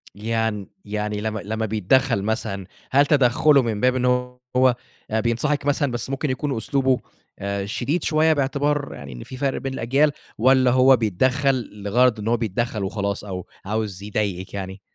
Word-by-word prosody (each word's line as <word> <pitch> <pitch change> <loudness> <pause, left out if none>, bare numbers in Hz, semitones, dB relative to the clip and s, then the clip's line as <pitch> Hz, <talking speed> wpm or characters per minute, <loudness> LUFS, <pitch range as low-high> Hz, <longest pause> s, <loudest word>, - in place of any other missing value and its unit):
يعن 110 -1 -2 0.2
يعني 105 0 -3
لم 110 -1 -2
لمّا 110 +2 -3
بيتدخّل 110 +2 +2
مثلًا، 110 -3 -2 0.3
هل 140 +2 +5
تدخُلُه 140 0 +4
من 115 -4 -2
باب 125 0 +3
إن 125 -1 0 0.5
هو 130 -1 +5 0.4
آآ 110 - +1
بينصحِك 120 +6 0
مثلًا، 145 -2 +1
بس 120 +1 -3
ممكن 135 +2 -2
يكون 135 +1 -2
أسلوبه 130 +3 +1 0.4
آآ 100 0 -2
شديد 135 - -2
شوية 160 0 +3
باعتبار 145 0 0
يعني 70 -2 -9
إن - - -8
في 130 - -9
فرق 135 0 0
بين 135 -1 -4
الأجيال؟ 135 +4 +2 0.3
والّا 130 +2 +4
هو 130 +1 +6
بيتدخّل 130 +5 +1
لغرض 120 +3 +3
إن 105 - -5
هو 120 - +2
بيتدخّل 110 -1 -2
وخلاص، 100 0 -2
أو 95 -3 -6 0.2
عاوز 105 -2 -3
يضايقِك 100 -3 -3
يعني؟ 95 0 -6
115 Hz, 165 wpm, -23 LUFS, 105-135 Hz, 0.5 s, هو